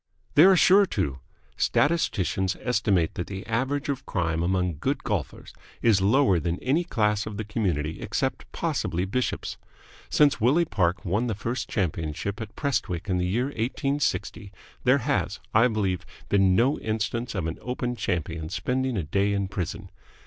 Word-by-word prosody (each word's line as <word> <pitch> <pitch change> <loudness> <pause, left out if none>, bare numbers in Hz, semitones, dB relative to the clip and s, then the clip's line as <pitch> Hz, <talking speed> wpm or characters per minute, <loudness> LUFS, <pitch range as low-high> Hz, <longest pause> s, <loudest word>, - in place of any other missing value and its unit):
"They 155 - +8
are 190 0 +7
sure 195 +3 +6
to. 70 - -2 0.4
Statisticians 105 - +1
estimate 105 -8 +1
that 90 - -4
the 95 -1 -6
average 135 +6 -1
of 135 -2 -3
crime 85 -3 -1
among 90 -2 0
good - - -1
golfers - - -3 0.3
is 110 -5 +4
lower 100 -2 +4
than 85 +1 -1
in - - -13
any 145 +7 +2
class 105 - 0
of 105 -2 -6
the 110 - -2
community 90 -8 -2
except - - -2
possibly 90 +2 -1
bishops. 125 +6 -2 0.5
Since 145 -6 +3
Willie 145 +9 +4
Park 95 - 0
won 105 +7 0
the 110 - -1
first 115 +5 -3
championship 85 +2 -2
at 110 -1 -7
Prestwick 100 - -2
in 90 -1 +1
the 90 - 0
year 115 +7 +1
1860 120 -5 -2 0.3
there - - +5
has, - - -1
I 115 +3 +6
believe, 100 -6 -1 0.3
been 95 -2 +4
no 130 +8 +3
instance 110 +2 -2
of 90 -4 -1
an 80 0 -4
Open 125 0 -3
Champion 85 -6 -3
spending 130 +2 -1
a 90 - -1
day 100 +7 +1
in 100 -1 -1
prison. 95 0 -5
105 Hz, 165 wpm, -26 LUFS, 90-125 Hz, 0.5 s, They